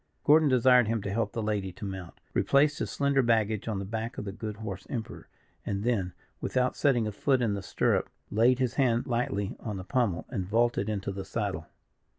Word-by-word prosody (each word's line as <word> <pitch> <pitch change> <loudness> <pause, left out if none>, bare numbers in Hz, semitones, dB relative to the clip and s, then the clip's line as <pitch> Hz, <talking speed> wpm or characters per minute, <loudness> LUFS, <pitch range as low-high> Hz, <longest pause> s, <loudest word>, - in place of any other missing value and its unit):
Gordon 150 0 +5
desired 125 -2 +5
him 115 -2 -1
to 100 - -3
help 110 -2 0
the 115 - -3
lady 105 -3 -1
to 100 - -8
mount, 95 -3 -6 0.2
replaced 145 +1 +3
his - - -2
slender 140 -1 +2
baggage 110 -3 +1
on 110 -3 -1
the 100 - -4
back 110 +3 -4
of - - -4
the 100 - -4
good 105 +1 -6
horse 100 -3 -7
Emperor, 115 -5 -5 0.4
and 100 0 -3
then, 100 -7 0 0.3
without 125 -1 0
setting 125 -6 +2
a 105 - -2
foot 130 +6 +1
in 115 -4 +1
the 100 - -3
stirrup, 95 - 0 0.2
laid 120 +4 +4
his 130 -3 0
hand 120 -4 +2
lightly 115 -5 -1
on 105 -3 -5
the 95 - -6
pummel, 105 -4 0
and 95 -8 -3
vaulted 115 -1 +1
into 100 -2 -2
the 95 0 -5
saddle. 95 -5 -3
110 Hz, 205 wpm, -29 LUFS, 100-125 Hz, 0.4 s, Gordon